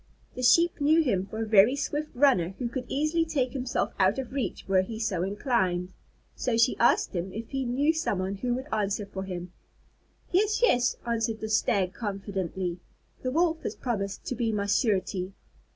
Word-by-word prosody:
The 255 - -6
Sheep 335 +6 +4
knew 315 +3 +5
him 195 -9 0
for 220 +2 -4
a - - -4
very 215 +4 +6
swift 295 +2 -2
runner, 215 -10 +3
who 245 - -2
could 250 +1 -4
easily 310 +4 +1
take 275 -6 -1
himself 255 -2 -2
out 190 +4 +3
of 265 -3 -4
reach, 270 -2 -3
were 190 -1 +4
he 220 +4 -6
so 210 -6 -1
inclined. 190 -3 0 0.4
So 240 -3 -1
she 235 +3 +4
asked 235 - +3
him 180 +2 -2
if 220 +3 -7
he 270 -1 -2
knew 280 +6 +2
someone 195 - -1
who 245 +3 -1
would 260 +1 -5
answer 205 -1 0
for 195 -1 -6
him. 180 -1 -6 0.8
"Yes, 420 +4 +2
yes," 250 - +3
answered 225 -1 -1
the 220 - -4
Stag 195 -3 +1
confidently, 190 -4 -3 0.4
"the 255 - -1
Wolf 325 +3 +1
has - - -4
promised 200 -5 -3
to - - -2
be 235 -2 -1
my 205 -2 -1
surety." 195 -3 0
225 Hz, 185 wpm, -27 LUFS, 195-265 Hz, 0.8 s, very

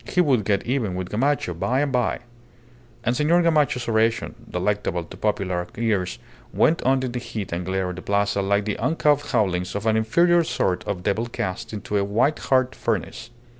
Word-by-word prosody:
He - - -1
would 135 - +3
get 100 -2 +1
even 120 -7 -1
with 90 -1 -4
Gamacho 130 -4 0
by 125 +11 0
and 145 -2 0
by. 125 -2 0 0.8
And 120 +2 +1
Senor 160 +5 +3
Gamacho's 150 -7 +2
oration, 115 0 +1 0.2
delectable 90 -1 -1
to 80 - -12
popular 90 -4 -1
ears, 105 -6 0 0.3
went 165 - +2
on 130 0 +2
in 130 - -2
the 125 - -3
heat 110 -5 -6
and 85 +1 -2
glare 95 0 -1
of 90 - -8
the - - -6
Plaza 100 0 +1
like 100 +1 +1
the 105 - -2
uncouth 150 -2 +1
howlings 90 -3 0
of 100 +1 -3
an 110 -1 +3
inferior 170 +11 +3
sort 125 - -1
of 95 -3 -3
devil 110 +5 0
cast 115 0 -4
into 105 -1 -3
a 100 - +2
white 115 +9 +1
hot 130 -1 +1
furnace. - - -3
110 Hz, 190 wpm, -23 LUFS, 100-130 Hz, 0.8 s, would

